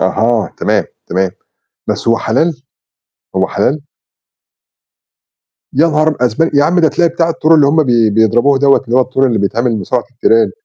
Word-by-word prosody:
أها، 110 +4 0
تمام، - - 0 0.2
تمام. 95 +1 -1 0.6
بس - - -3
هو 115 - +2
حلال؟ 135 +3 -1 0.7
هو 95 0 +1
حلال؟ 130 +9 -1 1.9
يا 155 +5 +3
نهار 155 0 +1
أب 150 - -2
أسب 125 +7 0
يا 145 - +4
عم 175 +4 +1
ده 160 - +3
تلاقي 170 +3 +1
بتاع 165 0 -1
التور 160 0 +2
اللي 150 -3 +4
هُم 155 +3 +2
بي 120 -5 +2
بيضربوه 120 +6 +2
دوّة، 140 0 +3
اللي 120 0 -1
هو - - +5
التور 130 +1 0
اللي 115 -3 -1
بيتعمل 115 +4 -1
مصارعة 120 +5 -2
التيران. 115 -1 +2
130 Hz, 170 wpm, -13 LUFS, 115-155 Hz, 1.9 s, هو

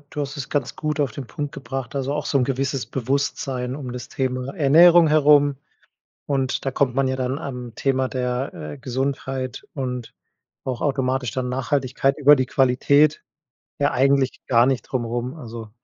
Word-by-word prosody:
du 150 - -4
hast 140 0 -4
es 140 - -5
ganz 140 -5 -2
gut 155 0 -3
auf 140 -6 0
den 130 -1 -7
Punkt 145 -1 -5
gebracht, 135 -2 -6
also 135 0 -1
auch 150 0 -3
so - - +1
'n 130 - +2
gewisses 135 0 -1
Bewusstsein 130 0 -2
um 130 -4 -6
das 125 -2 -7
Thema 130 0 -2
Ernährung 165 +2 +6
herum. 145 -2 +5 0.7
Und 135 -2 -1
da 135 - 0
kommt 130 -2 +1
man 135 0 +1
ja 130 - -1
dann 130 +2 -2
am 125 -6 -6
Thema 130 -1 0
der, 125 +1 -2 0.2
äh, - - -9
Gesundheit 130 -1 -3
und 125 -4 -4 0.5
auch 130 -3 -3
automatisch 130 -4 0
dann 125 +2 -2
Nachhaltigkeit 135 +1 0
über 145 0 +7
die 130 -1 0
Qualität, 140 +4 +3 0.6
ja 145 0 +2
eigentlich 135 0 +2
gar 120 -1 +5
nicht 130 -2 +1
drumrum. 120 +2 -3
Also, 115 -6 -8
135 Hz, 170 wpm, -22 LUFS, 125-140 Hz, 0.7 s, über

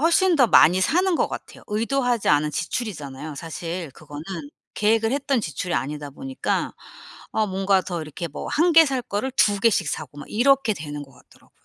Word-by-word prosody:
훨씬 340 +2 +4
더 255 - +5
많이 185 -3 +6
사는 360 - +2
것 - - +1
같아요. - - -8
의도하지 240 +2 0
않은 150 0 +3
지출이잖아요 150 - -4
사실 165 +1 -5
그거는. 150 -1 -10 0.5
계획을 225 +1 +2
했던 275 -2 0
지출이 170 0 -4
아니다 145 +3 -3
보니까 265 - -3 0.6
아 220 - +1
뭔가 195 0 +2
더 175 -3 -4
이렇게 155 +2 -6
뭐 145 - -7
1 335 +3 +2
개 325 - +9
살 265 -2 -1
거를 235 +2 -3
2 205 -5 +3
개씩 225 +1 +2
사고 145 -1 -5
막 - - -8
이렇게 250 -1 +3
되는 150 -2 -6
것 135 -1 -14
같더라고요. - - -23
200 Hz, 360 characters per minute, -23 LUFS, -, 0.6 s, 개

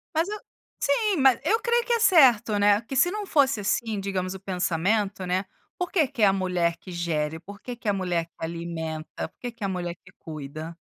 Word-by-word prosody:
Mas, 325 +3 +2
eu 425 0 -4 0.4
Sim. 400 +8 +2
Ma 265 -1 +7
eu 450 +2 +3
creio 475 0 +2
que 480 - +1
é 470 - +2
certo, 250 - +5
né, 205 +1 +4
que 265 +3 -7
se 350 - +5
não 420 +1 -4
fosse, 275 - +2
assim, 205 +1 -1
digamos 185 -1 -2
o 190 - -8
pensamento, 190 +2 0
né. 185 +2 0 0.3
Por 360 -1 -2
que 315 -7 +3
que 260 -6 -5
é - - +7
a 195 - +5
mulher 180 -3 0
que 185 - -11
gere? 160 -2 -2
Por 200 +4 -12
que, 250 - -6
que 230 -2 -10
é - - +4
a - - -1
mulher 180 -3 -1
que 165 - -38
alimenta? 165 -1 -5
Por - - -44
que, 245 - -4
que 230 -2 -10
é - - +1
a - - -1
mulher 175 -2 -3
que - - -20
cuida? 155 +1 -7
195 Hz, 235 wpm, -26 LUFS, 170-265 Hz, 0.4 s, Ma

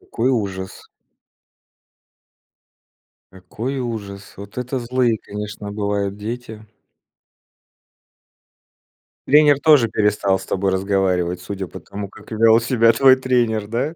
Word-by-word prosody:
Какой 120 +3 -2
ужас. 95 -5 -4 2.5
Какой 110 +9 -5
ужас. 105 -5 -6
Вот 100 +3 -11
это 125 +1 -3
злые, 120 -1 0
конечно, 105 0 -7
бывают 100 -1 -2
дети. 110 0 -7 2.6
Тренер 145 0 +5
тоже 145 -6 +5
перестал 105 -2 +1
с - - -10
тобой 95 0 -1
разговаривать, 95 -2 0
судя 95 0 -5
по - - -10
тому, 100 -1 -8
как - - -16
вёл 110 +1 +5
себя 115 -1 +3
твой 130 +3 +6
тренер, 120 -5 0
да? 130 +9 -2
110 Hz, 110 wpm, -20 LUFS, 100-125 Hz, 2.6 s, твой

